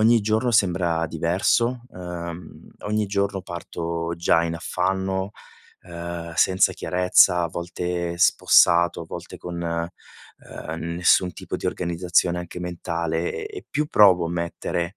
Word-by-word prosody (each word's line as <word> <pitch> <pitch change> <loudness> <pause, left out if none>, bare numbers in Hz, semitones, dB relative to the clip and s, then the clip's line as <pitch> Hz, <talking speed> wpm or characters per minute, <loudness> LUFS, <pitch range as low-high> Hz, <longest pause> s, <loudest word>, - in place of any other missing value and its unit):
ogni 115 +1 +5
giorno 110 +4 +1
sembra 85 -6 +2
diverso, 95 +10 0
uhm, 85 -3 -8
ogni 105 0 -1
giorno 100 0 -1
parto 85 -1 -4
già 85 0 +3
in 85 0 -2
affanno, 95 +2 -2 0.5
uhm, 85 -1 -7
senza 95 +2 +3
chiarezza, 90 0 +3
a - - +1
volte 85 0 -4
spossato, 85 0 +4
a - - -8
volte - - -8
con, 85 -1 -6
uhm, 85 -1 -7
nessun 90 +2 +2
tipo - - -8
di - - -10
organizzazione 85 0 0
anche 90 0 -7
mentale 85 -1 -3
e 420 -1 -10
e - - -13
più 150 +1 0
provo 95 - +5
a - - -5
mettere 85 +1 -3
85 Hz, 130 wpm, -23 LUFS, 85-95 Hz, 0.5 s, ogni